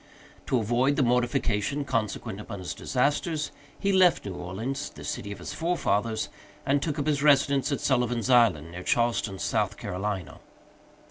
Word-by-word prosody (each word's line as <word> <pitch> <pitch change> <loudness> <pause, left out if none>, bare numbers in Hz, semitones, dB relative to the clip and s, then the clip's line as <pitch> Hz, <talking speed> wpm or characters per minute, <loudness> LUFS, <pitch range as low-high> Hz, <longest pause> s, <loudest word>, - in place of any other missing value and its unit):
To 130 - +2
avoid 120 +5 +2
the 140 - +2
mortification 125 +1 +1
consequent 110 -5 -2
upon 105 -1 -7
his 90 -2 -5
disasters, 150 +4 0 0.3
he 200 0 +1
left 185 -2 +4
New 100 - -4
Orleans, 110 +11 -4
the - - -12
city 100 - -4
of 100 - -6
his - - -7
forefathers, 115 - 0 0.4
and 140 +1 +2
took 150 0 -2
up 145 - -1
his 145 -2 +1
residence 140 -1 +4
at 140 - -1
Sullivan's 125 -3 +1
Island, 115 - +4
near 90 +1 -7
Charleston, 115 -2 +1
South 105 +1 0
Carolina. 100 -4 -4
120 Hz, 155 wpm, -27 LUFS, 105-140 Hz, 0.4 s, left